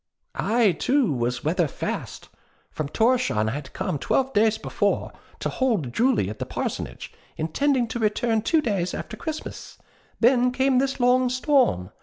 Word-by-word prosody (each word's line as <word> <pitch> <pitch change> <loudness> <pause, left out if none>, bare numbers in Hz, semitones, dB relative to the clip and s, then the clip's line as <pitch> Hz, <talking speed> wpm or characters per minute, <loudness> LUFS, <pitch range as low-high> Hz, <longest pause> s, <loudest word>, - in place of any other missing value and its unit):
I, 220 0 +2
too, 255 - +1
was 120 -1 -2
'weather 165 +2 +1
fast.' - - -5 0.4
From 155 - -3
Thorshavn 225 - +1
I - - -2
had 135 +1 -6
come, 145 - -2
twelve 265 - 0
days 220 0 +3
before, - - -1 0.3
to - - -2
'hold 210 - -1
Jule' 245 - +2
at 105 +2 -7
the - - -3
parsonage, - - -5 0.2
intending 245 - +1
to 240 - -4
return 220 +1 +1
two 320 +8 +2
days 195 -8 -1
after - - -6
Christmas. 315 -1 -7 0.4
Then 250 +1 +4
came 260 0 +2
this 270 0 -1
long 250 +1 +3
storm. 255 - +2
230 Hz, 155 wpm, -24 LUFS, 155-255 Hz, 0.4 s, Then